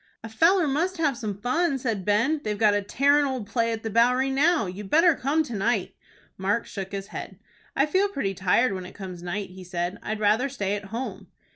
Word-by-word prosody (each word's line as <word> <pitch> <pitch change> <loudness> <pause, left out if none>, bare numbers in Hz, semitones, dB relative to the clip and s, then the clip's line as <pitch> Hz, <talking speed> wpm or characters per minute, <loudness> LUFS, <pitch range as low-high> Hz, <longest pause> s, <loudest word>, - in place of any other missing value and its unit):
"A 225 - -7
feller 330 - +3
must 340 +7 0
have 300 -5 +1
some 210 -4 -5
fun," 280 +5 +1
said 225 -7 -2
Ben. 235 +9 +2
"They've 210 -1 -2
got 210 -1 +4
a 205 - +1
tearin' 285 +8 +3
old 260 -6 -2
play 230 +2 0
at 225 -1 -4
the 225 - -2
Bowery 250 +4 +3
now. 300 - +3
You'd 190 +2 -7
better 330 - +5
come 290 +4 0
to 285 - -7
night." 210 -1 0 0.5
Mark 205 +5 0
shook 195 -2 -6
his 200 0 -5
head. 190 - -7 0.4
"I 275 - +3
feel 380 +6 +1
pretty 205 - -2
tired 195 +5 +2
when 185 -1 -5
it - - -14
comes 185 -3 -8
night," 185 +3 -4
he 185 0 -11
said. 180 +2 -3
"I'd 215 0 -4
rather 215 +6 +2
stay 205 -7 -2
at 205 0 -6
home." 230 +6 -6
225 Hz, 220 wpm, -25 LUFS, 200-275 Hz, 0.5 s, better